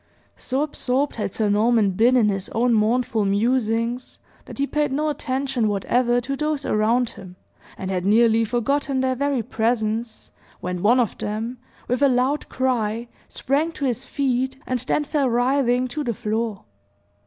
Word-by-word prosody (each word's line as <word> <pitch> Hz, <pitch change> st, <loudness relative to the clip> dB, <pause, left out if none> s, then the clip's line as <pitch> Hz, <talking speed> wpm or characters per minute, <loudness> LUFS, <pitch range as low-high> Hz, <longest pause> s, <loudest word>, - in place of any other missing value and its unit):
So 265 Hz, +3 st, -1 dB
absorbed 280 Hz, -2 st, -1 dB
had 210 Hz, -, -2 dB
Sir 215 Hz, +2 st, 0 dB
Norman 210 Hz, 0 st, +3 dB
been 235 Hz, +7 st, +4 dB
in 225 Hz, -4 st, +4 dB
his 195 Hz, -1 st, -3 dB
own 240 Hz, +1 st, +3 dB
mournful 225 Hz, 0 st, +1 dB
musings, 230 Hz, +3 st, 0 dB, 0.3 s
that -, -, -10 dB
he 280 Hz, -, +1 dB
paid 295 Hz, 0 st, -1 dB
no 300 Hz, +3 st, 0 dB
attention 265 Hz, -5 st, -1 dB
whatever 240 Hz, +4 st, +1 dB
to 275 Hz, +3 st, -3 dB
those 300 Hz, -1 st, -2 dB
around 225 Hz, +3 st, +2 dB
him, 185 Hz, -2 st, -12 dB, 0.4 s
and 190 Hz, 0 st, -4 dB
had 180 Hz, -1 st, -1 dB
nearly 225 Hz, +3 st, +4 dB
forgotten 260 Hz, +4 st, 0 dB
their 260 Hz, 0 st, +1 dB
very 275 Hz, -2 st, 0 dB
presence, 225 Hz, 0 st, -2 dB, 0.3 s
when 180 Hz, 0 st, -4 dB
one 235 Hz, +6 st, +4 dB
of 235 Hz, -4 st, -1 dB
them, 225 Hz, +4 st, -4 dB, 0.3 s
with 250 Hz, +2 st, -1 dB
a 280 Hz, -, +6 dB
loud 255 Hz, +4 st, 0 dB
cry, 235 Hz, -3 st, -1 dB, 0.2 s
sprang 295 Hz, +5 st, 0 dB
to 285 Hz, -, -3 dB
his 245 Hz, -4 st, -1 dB
feet, 265 Hz, -1 st, -1 dB
and 255 Hz, -1 st, -1 dB
then 260 Hz, +5 st, 0 dB
fell 290 Hz, -3 st, 0 dB
writhing 250 Hz, +1 st, +2 dB
to 300 Hz, +4 st, -3 dB
the 235 Hz, -4 st, -2 dB
floor. 220 Hz, -2 st, -2 dB
245 Hz, 165 wpm, -23 LUFS, 220-265 Hz, 0.4 s, a